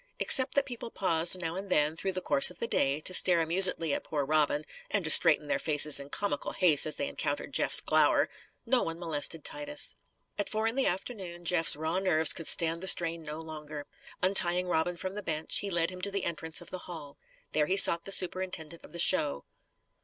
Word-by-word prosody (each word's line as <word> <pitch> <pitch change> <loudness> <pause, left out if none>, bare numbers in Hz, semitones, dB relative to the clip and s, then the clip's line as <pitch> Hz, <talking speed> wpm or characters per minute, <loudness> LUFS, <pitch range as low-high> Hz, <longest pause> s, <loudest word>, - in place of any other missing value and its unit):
Except 260 0 +4
that 280 -1 0
people 240 -2 -8
paused 175 -3 -1
now 165 -2 -2
and 195 +1 -8
then, 150 -2 0
through 190 +3 -4
the 185 - -4
course 140 - +2
of 180 - -14
the - - -4
day, 140 -9 -1
to 185 - +2
stare 180 -1 +5
amusedly 165 -2 +2
at - - -5
poor 145 -3 -5
Robin 150 0 -1 0.2
(and - - -2
to - - +2
straighten - - +5
their 280 -1 -3
faces 150 - +2
in 140 0 -12
comical 200 -3 -4
haste 160 -6 +3
as 155 - -3
they 280 - -5
encountered - - -5
Jeff's - - +4
glower), - - +1 0.4
no 260 -2 0
one 165 0 -6
molested 160 -2 -1
Titus. 295 0 -2 0.4
At 205 - -3
four 220 0 -3
in 225 - -2
the 270 +1 -2
afternoon 180 -3 -7
Jeff's 165 -1 +7
raw 160 +4 -4
nerves 160 -5 +2
could 165 - -8
stand 165 0 0
the 190 - -4
strain 170 -2 +3
no 155 0 -9
longer. 150 -2 -10 0.4
Untying 180 -1 +2
Robin 175 0 -3
from 185 +2 -7
the 210 - -7
bench, 160 -4 -2
he 200 - -6
led 170 -1 -1
him 180 0 -11
to 200 - -2
the 200 -2 -5
entrance 160 -1 -4
of - - -11
the 185 - -7
hall. 145 -5 -12 0.3
There 150 -1 -1
he 190 - -2
sought 170 -3 +6
the 195 - -7
superintendent 180 -3 0
of - - -15
the - - -9
show. 70 - +1
170 Hz, 215 wpm, -27 LUFS, 155-190 Hz, 0.4 s, Jeff's